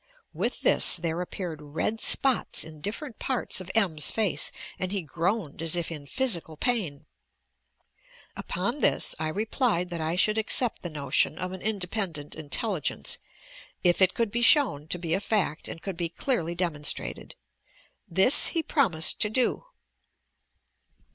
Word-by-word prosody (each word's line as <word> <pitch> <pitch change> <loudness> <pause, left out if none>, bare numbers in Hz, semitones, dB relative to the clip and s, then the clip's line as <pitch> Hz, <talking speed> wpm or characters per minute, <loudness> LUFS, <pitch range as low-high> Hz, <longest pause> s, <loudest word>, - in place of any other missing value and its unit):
With - - -2
this - - +5
there 170 0 -2
appeared 175 -3 -6
red 155 +9 -3
spots 265 -3 +1
in 155 -1 -12
dif 205 +7 -3
ferent 270 -8 -9
parts 255 -7 -1
of 185 - -9
M's. 175 -9 +3
face 215 -4 +1 0.3
and 185 0 -3
he 200 -3 -2
groaned 170 0 -2
as 165 0 +2
if 170 -1 -2
in 145 -3 -8
phy 260 - -2
sical 170 - 0
pain. 180 - -1 1.3
Upon - - -3
this - - +4
I 155 - -1
replied 205 - 0
that 170 -2 -4
I 160 +2 -1
shoidd 215 +4 +2
accept 230 +2 +1
the 175 - -5
notion 145 0 0
of 185 +1 -4
an 185 -1 -8
independent 190 -7 -2
intelligence, 160 +3 -1 0.6
it 175 +1 +3
it 185 -1 +4
could 230 -3 -1
be 240 +2 -1
shown 235 - +4
to 180 - -2
be 165 -2 -3
a 185 - +2
fact 200 -6 0
and 165 - -8
could 195 -4 -5
be 170 -1 -2
clearly 170 - -2
demonstrated. 165 -5 -1 0.7
This 190 +9 +5
he 330 -2 -1
promised 180 - +2
to 210 - +2
do." 250 - 0
180 Hz, 155 wpm, -27 LUFS, 160-220 Hz, 1.3 s, this